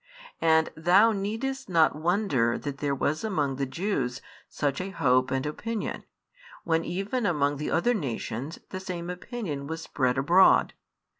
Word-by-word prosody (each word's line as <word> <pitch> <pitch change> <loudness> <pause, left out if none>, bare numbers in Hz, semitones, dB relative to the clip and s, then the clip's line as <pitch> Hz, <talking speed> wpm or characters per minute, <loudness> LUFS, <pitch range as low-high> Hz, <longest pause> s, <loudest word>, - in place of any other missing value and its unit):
And 160 -1 +3
thou 185 +8 +5
needest 225 +6 -3
not 165 -4 +4
wonder 155 - +1
that 145 -1 -6
there 140 -1 0
was 150 +5 -1
among 150 -11 -1
the 135 -1 -1
Jews 135 -6 -2 0.3
such 140 0 -1
a 190 - -4
hope 130 -7 +2
and 130 +1 -1
opinion, 220 +9 -4 0.6
when 165 -1 +1
even 205 +7 -2
among 145 -4 +1
the 150 - -3
other 240 +9 +2
nations 140 - -4
the 185 - -4
same 180 -2 -5
opinion 180 - -5
was 160 +1 -5
spread 130 -2 0
abroad. 170 +8 +5
160 Hz, 150 wpm, -27 LUFS, 140-195 Hz, 0.6 s, thou